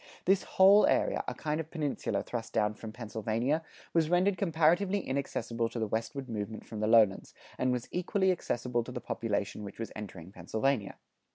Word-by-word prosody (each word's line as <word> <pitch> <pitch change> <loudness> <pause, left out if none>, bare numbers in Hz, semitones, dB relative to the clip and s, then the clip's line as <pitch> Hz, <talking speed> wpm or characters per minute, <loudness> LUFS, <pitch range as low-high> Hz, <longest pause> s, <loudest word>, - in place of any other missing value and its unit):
This 195 +1 +4 0.2
whole 195 +2 +8
area, - - +2
a - - -3
kind 150 0 -2
of 160 -1 -5
peninsula 145 - -2
thrust 115 -2 -5
down 105 -1 +2
from 110 +1 -8
Pennsylvania, 115 +6 -1 0.3
was 160 -2 +3
rendered 185 +3 +3
comparatively 175 +3 +2
inaccessible 120 -4 -2
to - - -7
the 110 - 0
westward 115 +5 -3
movement 110 -1 -5
from 110 - -7
the 110 - 0
lowlands, 110 -4 +4 0.2
and 130 0 +2
was 125 -1 -2
equally 190 +2 +1
accessible 120 -8 -1
to 125 - -8
the 125 - -4
population 105 -3 -2
which 100 -1 -8
was 115 - -5
entering 95 -4 -8
Pennsylvania. 110 +5 -1
120 Hz, 175 wpm, -31 LUFS, 110-160 Hz, 0.3 s, whole